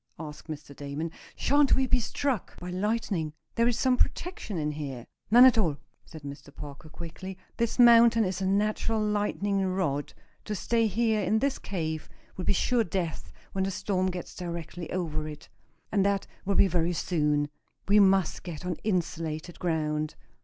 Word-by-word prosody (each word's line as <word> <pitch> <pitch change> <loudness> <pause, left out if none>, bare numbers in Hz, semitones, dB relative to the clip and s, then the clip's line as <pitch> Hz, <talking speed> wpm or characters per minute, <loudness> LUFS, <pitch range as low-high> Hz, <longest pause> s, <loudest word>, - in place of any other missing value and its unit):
asked 150 -1 -8
Mr. 150 -2 -7
Damon. 145 +4 -4 0.2
"Shan't 285 0 +3
we 265 - +2
be 255 - +3
struck 245 -1 -2
by 180 0 -6
lightning? 190 -5 -1 0.2
There 230 0 +3
is 240 -1 +1
some 255 0 +3
protection 335 - -1
in 150 -1 0
here." 140 -5 -5 0.2
"None 240 +4 +9
at 250 -3 +6
all," 160 -9 +1 0.3
said 160 -2 -11
Mr. 140 0 -9
Parker, 145 +3 -10
quickly. 170 +4 -8 0.2
"This 235 -1 0
mountain 235 -2 +7
is 185 0 -2
a 190 - +1
natural 215 +3 +1
lightning 205 -1 0
rod. 185 -7 -1 0.3
To 210 - -2
stay 230 +2 +2
here 220 +1 +1
in 215 - +2
this 275 +4 0
cave 160 -5 -3 0.3
will 185 - -5
be - - +3
sure 235 +4 +2
death 175 -4 -3 0.2
when 190 - 0
the 190 - 0
storm 190 -1 0
gets 180 -2 -5
directly 170 -1 -6
over 155 -4 -2
it. 150 -1 -9 0.4
And 200 -2 +3
that 200 -1 +1 0.2
will 200 0 +1
be 195 - +6
very 175 -1 +1
soon. 150 -3 +1 0.4
We 205 +1 +6
must 195 -3 +4
get 175 -1 -7
on 180 -2 -2
insulated 170 -4 -2
ground. 155 -3 -1
185 Hz, 170 wpm, -28 LUFS, 155-215 Hz, 0.4 s, None